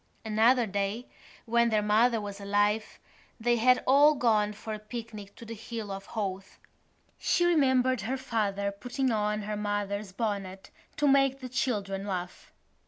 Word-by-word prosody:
Another 230 +3 +3
day, 200 +3 -2 0.4
when 235 0 +3
their 215 -2 +1
mother 225 +3 +3
was 205 -1 -7
alive, 205 +2 0 0.4
they 240 +1 +2
had 250 +2 +4
all 290 +3 +6
gone 215 -5 +2
for 215 +1 -7
a 215 - -5
picnic 215 -2 -8
to 235 - -11
the 230 - -7
Hill 225 -1 -6
of 195 0 -7
Howth. 195 -3 -4 0.6
She 350 - +2
remembered 260 - +3
her 250 +7 -2
father 205 -6 -1
putting 245 +5 -2
on 210 -1 0
her 210 +1 -3
mother's 205 -1 -3
bonnet 195 -3 -4 0.3
to 295 - +2
make 275 -1 +3
the 255 -1 -7
children 200 -6 -2
laugh. 180 -2 -5
215 Hz, 155 wpm, -29 LUFS, 205-245 Hz, 0.6 s, all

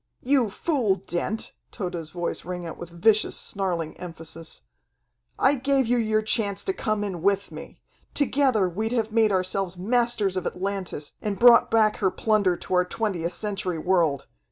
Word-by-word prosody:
"You 255 -4 +3
fool, 235 - 0
Dent," 195 +3 -3 0.2
Tode's 175 -5 -5
voice 175 0 -3
rang 180 -1 -5
out 165 - -7
with 175 - -7
vicious, 210 +5 +2
snarling 175 -5 -2
emphasis, 165 -2 -8 0.7
"I 270 - +4
gave 275 0 +1
you 245 +1 +2
your 215 -1 +1
chance 210 -2 0
to 385 - -1
come 215 - -1
in 190 -5 -4
with 200 +2 +1
me. - - -10 0.4
Together 265 -8 +2
we'd 215 +6 -2
have 225 -3 0
made 220 -1 +3
ourselves 185 -1 -1
masters 225 -1 +1
of 185 -1 -1
Atlantis 185 -5 -4
and 205 -2 -2
brought 240 -1 +7
back 220 -2 +3
her 195 -5 +2
plunder 200 -2 +1
to - - -6
our 180 0 +4
Twentieth 180 -4 -2
Century 195 -5 -3
world. 165 -5 +1
200 Hz, 160 wpm, -25 LUFS, 180-225 Hz, 0.7 s, brought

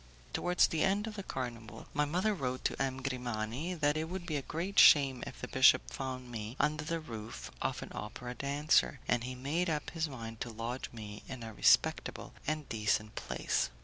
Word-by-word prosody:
Towards 180 0 +4
the 160 - 0
end 200 +2 +2
of 220 -1 -6
the 200 - -4
carnival, 120 - -6
my 150 0 +2
mother 180 +8 +1
wrote 130 -8 -3
to - - 0
M. 130 -1 -1
Grimani 125 +5 -2
that 150 -2 +2
it 155 +1 0
would 180 -1 -5
be 160 -4 -2
a 140 - 0
great 175 +8 -1
shame 135 -4 +7
if - - -9
the - - -5
bishop - - +5
found 130 - -5
me 110 0 -5
under 155 +1 +1
the 165 +2 -2
roof 115 -7 -7
of - - -1
an - - -10
opera 120 +3 -6
dancer, 140 +1 +2
and 120 -1 +2
he 130 0 -4
made 155 +8 0
up 150 -2 -2
his 160 -2 -1
mind 115 -4 -7
to 120 - -2
lodge 115 +3 -4
me 105 -2 -8
in 130 -3 -6
a 110 -1 -7
respectable - - +3
and 155 -1 -1
decent 110 -1 0
place. - - -1
130 Hz, 200 wpm, -33 LUFS, 115-155 Hz, -, shame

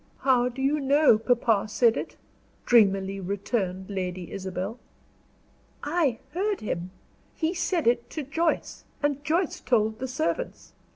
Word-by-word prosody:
"How 250 -2 +3
do 260 +2 -5
you 290 +3 +2
know 280 -4 +4
papa 225 -3 +2
said 225 +2 +3
it?" - - -5 0.5
dreamily 195 -4 +3
returned 190 -1 -2
Lady 180 -2 -4
Isabel. 190 +4 -4 1.0
"I 295 -6 +1 0.2
heard 400 +3 -1
him. 180 -4 -3 0.5
He 325 +1 0
said 345 -1 -1
it 240 0 +2
to 310 - -4
Joyce, 320 +5 -1 0.2
and 290 -1 0
Joyce 330 +3 0
told 220 -2 +1
the 260 - -3
servants. 320 - -3
245 Hz, 130 wpm, -26 LUFS, 200-295 Hz, 1.0 s, know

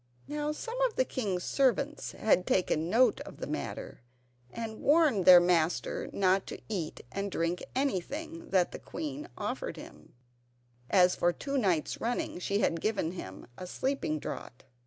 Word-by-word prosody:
Now 295 0 -2
some 465 +10 -5
of 475 - -10
the 260 - +2
king's 195 -9 -2
servants 280 +2 +1
had 185 -4 +2
taken 165 -3 +1
note 230 +2 +4
of - - -9
the - - -5
matter, - - -5 0.5
and 220 - -6
warned 290 - +4
their 180 -1 +11
master 175 -1 +1
not 190 0 +2
to - - -6
eat 180 -8 -4
and 200 +7 -2
drink 170 +1 -1
anything 295 - -2
that 185 -2 +3
the - - -7
queen 300 +1 -6
offered - - -3
him, - - -13 0.7
as 180 -2 +5
for 175 - +2
two 275 +10 -5
nights 185 - +1
running 235 -5 -2
she 200 +3 0
had 165 -4 +1
given 200 -7 0
him 95 - -8
a 180 - -6
sleeping 260 - -1
draught. 125 -4 -7
200 Hz, 155 wpm, -30 LUFS, 180-280 Hz, 0.7 s, their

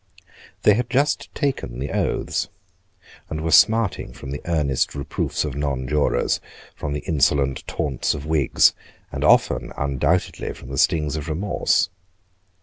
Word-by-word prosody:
They 105 - +7
had 115 +3 -1
just 140 +2 +1
taken 135 - -2
the 70 +2 -4
oaths, - - -1 0.8
and 80 - -3
were 80 0 -1
smarting 110 - +4
from 65 - -8
the 70 - -5
earnest 75 -7 0
reproofs 70 +2 -2
of 75 - -4
nonjurors, 70 -1 0 0.4
from 70 - -4
the 75 - -3
insolent 70 -4 +1
taunts 70 -4 -1
of 70 - -7
Whigs, 75 -3 +3 0.4
and - - -4
often - - +3
undoubtedly 70 +5 -1
from 65 - -12
the 70 -1 -3
stings 75 -2 +2
of 75 +1 -5
remorse. 95 +7 +1
75 Hz, 140 wpm, -22 LUFS, 70-85 Hz, 0.8 s, They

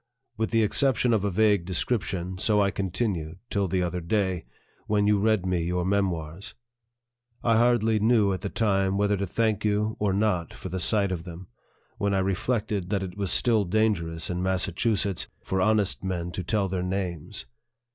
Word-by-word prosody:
With 110 0 -1
the 115 -1 +3
exception 125 +2 +2
of 105 -3 +1
a 100 - +1
vague 105 -1 +3
description, 95 -1 -2
so 105 +1 +2
I 100 -1 +3
continued, 95 -4 -2
till 100 -2 +1
the 90 +1 0
other 90 0 -2
day, 95 - -1 0.4
when 105 -1 +2
you 105 -1 +3
read 110 -2 +2
me 90 -2 0
your 90 +1 -1
memoirs. 95 0 -2 0.9
I 115 -2 +3
hardly 115 -2 +3
knew, 110 -2 +3
at 95 - -4
the 100 - -3
time, 95 -3 +1
whether 105 0 +2
to 100 0 -2
thank 110 +2 0
you 105 +1 0
or 105 -2 +1
not 95 -4 0
for 95 - -7
the 95 +2 -3
sight 100 +2 +1
of 85 -3 -3
them, 90 0 -10 0.5
when 100 -1 +1
I - - +2
reflected 100 0 -1
that 100 -2 0
it 90 -2 -6
was 100 -2 -2
still 115 -4 +3
dangerous, 85 -5 0
in 90 0 -2
Massa 95 0 0
chusetts, 100 0 0 0.2
for 95 0 -1
honest 105 -2 +1
men 90 -2 -3
to 90 +2 -4
tell 100 +2 0
their 95 -1 -2
names 90 -1 -3
100 Hz, 185 wpm, -26 LUFS, 90-105 Hz, 0.9 s, the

